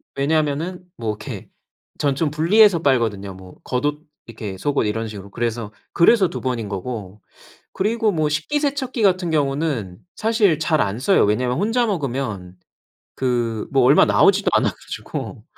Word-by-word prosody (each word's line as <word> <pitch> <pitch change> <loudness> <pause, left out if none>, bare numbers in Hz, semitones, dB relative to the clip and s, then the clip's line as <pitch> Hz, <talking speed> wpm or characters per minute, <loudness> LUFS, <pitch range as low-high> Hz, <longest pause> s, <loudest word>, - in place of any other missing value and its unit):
왜냐하면은 155 +5 -1
뭐 115 -2 -3
이렇게 105 0 -8 0.5
전 140 -2 0
좀 150 0 0
분리해서 175 +4 +4
빨거든요. 110 -8 0
뭐 95 -1 -13
겉옷 145 +4 -2 0.3
이렇게 105 -4 -7
속옷 140 +2 0
이런 115 +1 -2
식으로 100 -2 -9
그래서, 115 -2 -3 0.2
그래서 190 +2 +5
2 - - -6
번인 120 -5 -2
거고. 100 -1 -6 0.5
그리고 220 +2 +1
뭐 155 -3 0
식기세척기 270 - -1
같은 185 -3 +2
경우는 140 - -1 0.2
사실 215 -8 +2
잘 155 -1 +1
안 105 +3 -1
써요. 195 +9 +3
왜냐하면 125 +5 0
혼자 230 +4 +1
먹으면 125 - -3 0.6
그 120 -4 -1
뭐 135 -2 +4
얼마 140 +4 +6
나오지도 200 +1 +4
않아 - - +3
가지고 - - -7
140 Hz, 325 characters per minute, -21 LUFS, 110-180 Hz, 0.6 s, 얼마